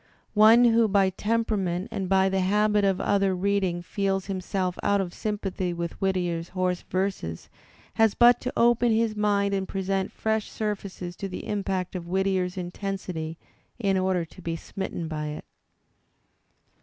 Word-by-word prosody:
One 220 Hz, +3 st, +7 dB
who 230 Hz, -1 st, +5 dB
by 195 Hz, -2 st, +3 dB
temperament 205 Hz, -3 st, -1 dB
and 195 Hz, -4 st, -3 dB
by 190 Hz, 0 st, +4 dB
the 190 Hz, 0 st, 0 dB
habit 210 Hz, +2 st, +2 dB
of 195 Hz, -1 st, +2 dB
other 195 Hz, -1 st, +2 dB
reading 185 Hz, -2 st, 0 dB
feels 195 Hz, +1 st, -1 dB
himself 185 Hz, -1 st, -2 dB
out 200 Hz, 0 st, +2 dB
of 180 Hz, -2 st, -3 dB
sympathy 195 Hz, -4 st, -3 dB
with 170 Hz, 0 st, -5 dB
Whittier's 175 Hz, -3 st, -1 dB
hoarse 185 Hz, -1 st, -1 dB
verses 185 Hz, -, -2 dB, 0.4 s
has 225 Hz, -2 st, +3 dB
but 240 Hz, 0 st, +6 dB
to 255 Hz, -, -3 dB
open 240 Hz, 0 st, +4 dB
his 220 Hz, -1 st, +1 dB
mind 200 Hz, -1 st, +1 dB
and 190 Hz, -1 st, -1 dB
present 195 Hz, 0 st, -2 dB
fresh 220 Hz, -1 st, -1 dB
surfaces 195 Hz, -4 st, -4 dB
to 195 Hz, -, -4 dB
the 180 Hz, -, -6 dB
impact 195 Hz, -3 st, -2 dB
of 175 Hz, -2 st, -5 dB
Whittier's 190 Hz, 0 st, 0 dB
intensity 180 Hz, -3 st, -4 dB, 0.4 s
in 200 Hz, -5 st, +1 dB
order 185 Hz, -2 st, +1 dB
to 180 Hz, +3 st, -15 dB
be 165 Hz, -1 st, -3 dB
smitten 170 Hz, -1 st, -5 dB
by 155 Hz, -1 st, -3 dB
it. 150 Hz, 0 st, -6 dB
195 Hz, 155 wpm, -26 LUFS, 180-205 Hz, 0.4 s, One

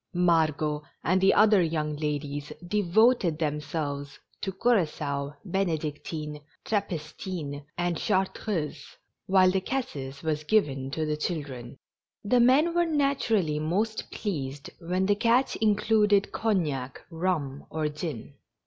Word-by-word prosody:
Margot 155 Hz, -4 st, +2 dB, 0.2 s
and 185 Hz, +2 st, +2 dB
the 195 Hz, -, +5 dB
other 210 Hz, -2 st, +6 dB
young 155 Hz, -2 st, -1 dB
ladies 145 Hz, -1 st, -3 dB, 0.2 s
de 210 Hz, +3 st, +1 dB
voted 205 Hz, -2 st, +3 dB
themselves 145 Hz, -2 st, -3 dB, 0.2 s
to 195 Hz, -, -2 dB
cura9oa, 150 Hz, -10 st, 0 dB
ben^dictine, 155 Hz, -4 st, -2 dB, 0.2 s
trappistine, 160 Hz, -6 st, -3 dB
and 175 Hz, -1 st, 0 dB
chartreuse, 185 Hz, -6 st, -1 dB, 0.4 s
while 185 Hz, -1 st, +5 dB
the 190 Hz, 0 st, 0 dB
cassis 150 Hz, -, -4 dB
was 155 Hz, -1 st, -1 dB
given 145 Hz, -9 st, +1 dB
to 155 Hz, +3 st, -2 dB
the 150 Hz, 0 st, -1 dB
chil 155 Hz, 0 st, -2 dB
dren. 125 Hz, -2 st, -9 dB, 0.5 s
The 245 Hz, +4 st, +3 dB
men 270 Hz, +8 st, +5 dB
were 345 Hz, 0 st, +2 dB
naturally 245 Hz, -, +1 dB
most 205 Hz, +8 st, -1 dB
pleased 145 Hz, -8 st, -4 dB
when 180 Hz, +2 st, 0 dB
the 205 Hz, -, +4 dB
catch 235 Hz, +5 st, +2 dB
included 210 Hz, -1 st, +3 dB
cognac, 150 Hz, -, -1 dB
rum 160 Hz, -5 st, -2 dB
or 155 Hz, -1 st, -1 dB
gin. 150 Hz, -4 st, -5 dB
165 Hz, 120 wpm, -27 LUFS, 150-205 Hz, 0.5 s, other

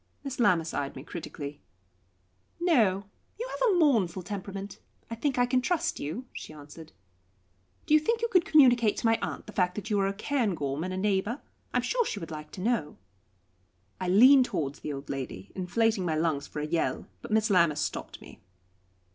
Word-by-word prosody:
Miss 275 Hz, -2 st, -5 dB
Lammas 175 Hz, -8 st, +3 dB
eyed 140 Hz, -1 st, -3 dB
me 130 Hz, -, -8 dB
critically. 150 Hz, -3 st, -7 dB, 1.0 s
"No; 220 Hz, -, +3 dB, 0.3 s
you 485 Hz, -, -3 dB
have -, -, +1 dB
a 390 Hz, -, +3 dB
mournful 220 Hz, -, +2 dB
temperament. 195 Hz, +1 st, -6 dB, 0.3 s
I -, -, -2 dB
think 260 Hz, +3 st, -1 dB
I 245 Hz, -, +4 dB
can 255 Hz, +1 st, +1 dB
trust 345 Hz, +5 st, -1 dB
you," 165 Hz, -, -4 dB
she -, -, -8 dB
answered. 150 Hz, +2 st, -12 dB, 0.9 s
"Do -, -, +1 dB
you 310 Hz, -, +8 dB
think 460 Hz, +9 st, 0 dB
you -, -, +3 dB
could 365 Hz, -6 st, +4 dB
communicate 245 Hz, -9 st, +5 dB
to -, -, -3 dB
my 225 Hz, 0 st, +3 dB
aunt -, -, -4 dB
the 215 Hz, -, -11 dB
fact 180 Hz, -1 st, +1 dB
that 210 Hz, +1 st, -5 dB
you 205 Hz, -, +2 dB
are 195 Hz, -, +2 dB
a 195 Hz, -, -1 dB
Cairngorm 190 Hz, -, -1 dB
and 185 Hz, -, -3 dB
a 185 Hz, -, -3 dB
neighbour? 205 Hz, +5 st, 0 dB, 0.3 s
I -, -, 0 dB
am -, -, +1 dB
sure -, -, +1 dB
she 220 Hz, -, -4 dB
would 165 Hz, -2 st, -8 dB
like 150 Hz, -1 st, -7 dB
to 185 Hz, -, -7 dB
know." 215 Hz, -8 st, -1 dB, 1.0 s
I 185 Hz, -, -3 dB
leaned 255 Hz, +8 st, +7 dB
towards 145 Hz, -, -3 dB
the 150 Hz, -, -5 dB
old 140 Hz, 0 st, -6 dB
lady, 130 Hz, -8 st, -6 dB
inflating 215 Hz, +2 st, +1 dB
my 165 Hz, -3 st, 0 dB
lungs 155 Hz, -3 st, 0 dB
for 150 Hz, -, -5 dB
a -, -, -2 dB
yell. 155 Hz, -5 st, -1 dB, 0.2 s
But -, -, -9 dB
Miss 220 Hz, 0 st, +2 dB
Lammas 170 Hz, -5 st, +4 dB
stopped -, -, -4 dB
me. -, -, -14 dB
195 Hz, 195 wpm, -28 LUFS, 160-245 Hz, 1.0 s, you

